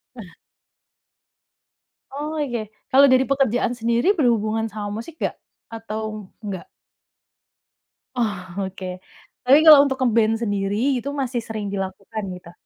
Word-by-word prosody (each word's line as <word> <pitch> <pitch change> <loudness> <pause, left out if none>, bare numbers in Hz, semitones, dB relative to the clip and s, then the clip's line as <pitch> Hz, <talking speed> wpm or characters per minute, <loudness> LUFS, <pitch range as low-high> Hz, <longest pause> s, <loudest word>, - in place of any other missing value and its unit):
Eh. 205 -7 -10 1.8
Oke, 285 -6 -3 0.2
kalau 275 +1 +7
dari 260 0 +5
pekerjaan 265 -4 +1
sendiri 235 - +1
berhubungan 225 - +1
sama 210 -1 -6
musik 315 +7 -9
nggak? - - -2 0.4
Atau, 215 -2 -6 0.2
nggak? 195 -4 -6 1.5
Oh, 195 -5 -2
oke. 185 -1 -7 0.5
Tapi 270 +3 +8
kalau 305 -3 +10
untuk 265 - -2
nge-band 225 -2 +3
sendiri 200 -1 -1 0.2
itu 260 +4 -5
masih 250 -2 -2
sering 215 -2 -4
dilakukan 195 +2 -5
gitu? 175 -1 -13
225 Hz, 115 wpm, -22 LUFS, 205-255 Hz, 1.8 s, kalau